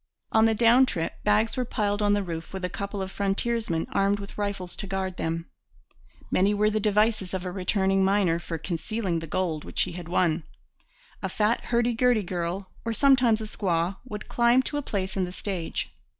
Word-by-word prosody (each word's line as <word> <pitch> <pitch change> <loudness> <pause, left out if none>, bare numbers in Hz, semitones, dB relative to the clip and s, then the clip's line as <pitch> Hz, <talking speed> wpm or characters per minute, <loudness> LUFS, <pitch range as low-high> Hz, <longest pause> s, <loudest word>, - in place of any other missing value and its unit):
On 220 0 +5
the 225 0 +3
down 240 +4 +6
trip 165 -8 -3
bags 210 +2 +2
were 255 - 0
piled 210 -4 -1
on 205 0 +3
the 205 0 +1
roof 165 -2 -6
with 190 -1 -3
a - - -2
couple 200 0 -4
of 190 - -6
frontiersmen 200 -3 0
armed 200 +1 +2
with 200 0 -9
rifles 200 -3 -3
to 200 - -4
guard 190 -1 -3
them. 165 +1 -2 0.9
Many 200 +3 +3
were 210 +1 +3
the 215 - +1
devices 210 -2 +1
of 185 0 -4
a 180 - -3
returning 190 +1 +1
miner 190 -4 +2
for 170 -1 -5
concealing 175 +2 -2
the 165 - -7
gold 160 -2 -1
which - - 0
he 185 - -4
had 175 -1 -7
won. 175 -2 +2 0.8
A - - -2
fat 215 +2 +1
hurdy 240 0 +2
gurdy 240 -2 +3
girl 180 +1 -3
or 230 - -1
sometimes 250 -3 +4
a - - -3
squaw 185 -3 -1
would 215 -4 -7
climb 240 +2 +4
to 290 - -3
a - - 0
place 195 -8 -3
in 190 -2 +1
the 180 - -7
stage. 185 -3 -4
200 Hz, 200 wpm, -26 LUFS, 180-220 Hz, 0.9 s, down